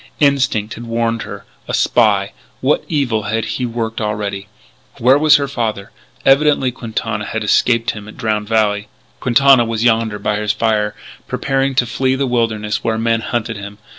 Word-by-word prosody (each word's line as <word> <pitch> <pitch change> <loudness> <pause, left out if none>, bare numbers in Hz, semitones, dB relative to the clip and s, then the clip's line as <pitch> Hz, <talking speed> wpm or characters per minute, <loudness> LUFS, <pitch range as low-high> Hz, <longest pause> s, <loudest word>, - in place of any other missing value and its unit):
Instinct 140 -7 +2
had 120 +1 -9
warned 115 0 -1
her. - - -8 0.2
A - - -1
spy! - - +2 0.3
What - - +1
evil 120 -9 0
had 110 +1 -1
he 125 - -2
worked 115 -1 -3
already? 105 -2 -3 0.5
Where 125 +3 +5
was 155 0 +6
her 140 -1 +1
father? 115 -5 -3 0.3
Evidently 135 -1 +4
Quintana 115 -3 -4
had 110 -1 -3
escaped 115 +2 +2
him 105 -1 -9
at 110 - -12
Drowned 105 -2 -1
Valley.... 105 -2 +1 0.3
Quintana 130 0 +5
was 115 -1 -2
yonder 115 -2 +2
by 105 0 -1
his 105 -1 0
fire, 105 -1 0 0.3
preparing 135 0 -1
to 125 - +3
flee 130 +3 0
the 135 +1 0
wilderness 115 -4 -1
where 110 -1 0
men 115 0 +1
hunted 115 -1 -3
him.... 100 0 -8
115 Hz, 165 wpm, -17 LUFS, 105-125 Hz, 0.5 s, was